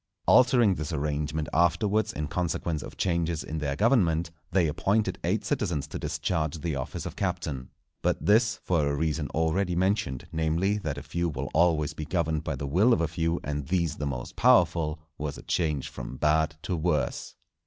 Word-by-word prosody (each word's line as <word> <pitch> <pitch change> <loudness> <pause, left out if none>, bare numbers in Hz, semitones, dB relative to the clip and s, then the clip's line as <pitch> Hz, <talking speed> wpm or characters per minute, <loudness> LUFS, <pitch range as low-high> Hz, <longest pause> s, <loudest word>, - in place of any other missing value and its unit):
Altering 120 -5 +5
this 75 -1 -4
arrangement 75 0 -2
afterwards 90 +6 +2
in 75 0 -3
consequence 85 -1 -2
of - - -9
changes 85 -3 0
in 80 +1 -4
their 70 -2 -1
government, 85 - +2 0.2
they 90 -1 +3
appointed 100 +8 0
eight - - 0
citizens 75 -5 -1
to - - -6
discharge 80 -3 -1
the 80 -1 -3
office 65 -2 -4
of - - -6
Captain. 65 -3 -3 0.3
But - - 0
this, 110 +2 +4
for 80 -5 +1
a 70 - 0
reason 75 0 -1
already 85 +3 0
mentioned, 95 - 0
namely 80 +6 +1
that 80 -7 -3
a 70 - -6
few 85 0 -1
will 70 -2 -4
always 80 -3 +3
be 75 - -5
governed 80 -2 -1
by 80 - -2
the 70 - -5
will 95 - +4
of 85 - +2
a 80 - +2
few 80 +2 -1
and 75 -1 -3
these 85 -2 0
the 75 - -2
most 60 -3 -5
powerful, 80 -2 +3 0.2
was 75 -1 -3
a - - -11
change 75 -5 -1
from - - -7
bad 80 +1 +2
to 90 - -1
worse. 80 -1 -1
80 Hz, 185 wpm, -27 LUFS, 75-90 Hz, 0.3 s, Altering